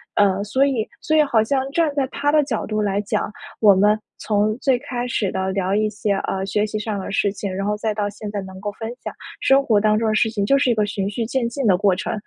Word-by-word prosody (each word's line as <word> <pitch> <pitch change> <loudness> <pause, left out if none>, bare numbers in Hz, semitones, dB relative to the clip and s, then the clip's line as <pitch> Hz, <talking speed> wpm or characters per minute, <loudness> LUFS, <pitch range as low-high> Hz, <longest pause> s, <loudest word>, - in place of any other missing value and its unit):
呃， 200 -1 +3
所 260 +6 +1
以 245 -6 0
所 315 0 +1
以 305 - +6
好 230 -6 +2
像 265 +3 0
站 325 -1 +2
在 275 -2 +1
他 290 +1 0
的 300 -1 +4
角 245 -6 -3
度 215 0 -1
来 200 0 0
讲， 210 0 -2 0.3
我 205 -3 +7
们 210 +3 +3 0.2
从 215 0 +1
最 265 -3 +2
开 245 -2 -4
始 215 -5 -1
地 190 0 -1
聊 195 0 0
一 215 0 +1
些， 210 0 -2
呃， 195 0 -2
学 205 +2 0
习 215 - -4
上 210 -1 -3
的 190 - -5
事 200 -1 +1
情， 200 -1 -4
然 195 +1 -2
后 210 - 0
再 220 +1 -1
到 205 -1 -1
现 210 0 -7
在 205 - -3
能 190 0 -10
够 205 0 -3
分 225 0 -6 0.2
享 - - -4 0.3
生 270 +1 +4
活 215 -6 +3
当 215 0 +3
中 225 +1 0
的 - - +1
事 220 - +3
情， 205 -3 -1
就 275 - +4
是 255 - +2
一 235 - +3
个 210 -1 +2
循 200 -1 -2
序 225 +3 -3
渐 235 0 -1
进 265 +1 -3
的 195 - +5
过 195 -2 +3
程。 185 - -3
215 Hz, 295 characters per minute, -21 LUFS, 200-240 Hz, 0.3 s, 我